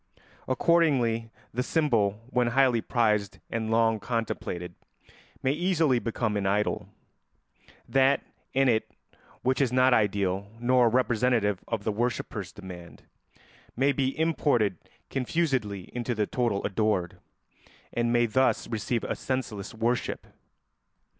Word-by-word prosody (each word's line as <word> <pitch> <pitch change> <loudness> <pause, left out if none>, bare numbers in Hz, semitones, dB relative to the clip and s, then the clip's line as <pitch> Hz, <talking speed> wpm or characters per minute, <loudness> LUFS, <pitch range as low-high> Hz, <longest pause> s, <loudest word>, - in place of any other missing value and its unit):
Accordingly 130 -6 +2 0.2
the 125 - 0
symbol, 115 -9 +1
when 125 -1 +2
highly 125 -1 +3
prized 105 -5 +1
and 110 -1 -2
long 115 -1 +3
contemplated, 105 -6 -3 0.7
may 130 - +3
easily 160 -5 +2
become 115 -2 -2
an 100 -1 0
idol; 105 +2 0 1.0
that 135 0 +3 0.3
in 135 0 +3
it 110 -3 +2 0.5
which 130 +2 +1
is 130 -3 +2
not 130 0 +4
ideal 100 -2 +1
nor 125 0 +4
representative 115 -4 +1
of 115 -3 -2
the 110 - 0
worshipper's 120 +2 -2
demand 90 -4 -11 0.7
may 135 +3 +3
be 135 -1 -1
imported 140 - +1 0.3
confusedly 125 - -1
into 120 0 -2
the 105 -1 +1
total 115 -3 -1
adored, 100 -3 0 0.7
and 120 0 +1
may 120 0 +4
thus 130 +4 +1
receive 115 +1 -2
a - - -2
senseless 120 -7 -3
worship. 115 +2 -1
120 Hz, 120 wpm, -27 LUFS, 105-130 Hz, 1.0 s, not